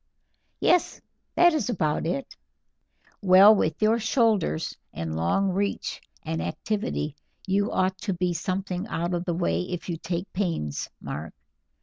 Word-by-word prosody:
"Yes, 355 -1 +2 0.4
that 350 -1 +6
is 305 -5 0
about 160 -8 0
it." 270 +10 -3 0.9
"Well, 195 +2 +8
with 160 -6 0
your 225 +2 +4
shoulders 220 - +1 0.2
and 80 0 -4
long 135 - +1
reach 200 +2 -2 0.2
and 80 0 -2
activity, 155 - -2 0.3
you 200 +2 +1
ought 185 0 0
to 195 0 -2
be 180 0 0
something 185 +3 -3
out 170 -2 -2
of 175 0 -2
the 175 -3 -1
way 175 0 0
if 180 0 -5
you 170 - -2
take 170 +3 -4
pains, 170 - -2
Mark. 75 +2 -6
185 Hz, 140 wpm, -26 LUFS, 165-205 Hz, 0.9 s, Well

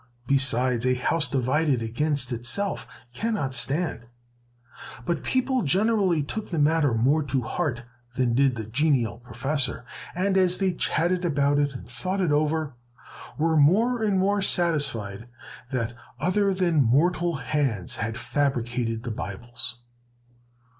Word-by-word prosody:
Besides, 130 -2 +2
a 130 - +3
house 150 +4 +1
divided 135 +2 +1
against 130 +3 -1
itself 120 - -3 0.3
cannot 150 - -2
stand." 135 -2 -2 1.0
But 170 - -1
people 260 0 +1
generally 190 0 +2
took 215 +9 -5
the 170 - -3
matter 150 -4 +3
more 135 +8 +3
to 135 -2 -1
heart 125 -3 -2 0.3
than 125 -2 +1
did 135 0 +3
the 110 -2 -5
genial 120 -2 +1
professor, 125 +1 -3 0.3
and, 190 +2 +1
as 180 -1 +3
they 190 -2 +1
chatted 175 +2 0
about 145 -3 +2
it 145 -2 0
and - - -8
thought 185 +12 -3
it 180 -5 +1
over, 150 0 0 0.6
were 160 +1 +1
more 220 +12 +4
and 205 -3 +1
more 200 +2 +2
satisfied 135 - 0 0.4
that 120 -3 -2 0.3
other 195 +4 +2
than 175 -5 +2
mortal 170 +7 +2
hands 135 - -1
had 115 +1 -3
fabricated 120 -5 -1
the 120 - -4
Bibles. 115 +3 -2
145 Hz, 135 wpm, -25 LUFS, 120-175 Hz, 1.0 s, more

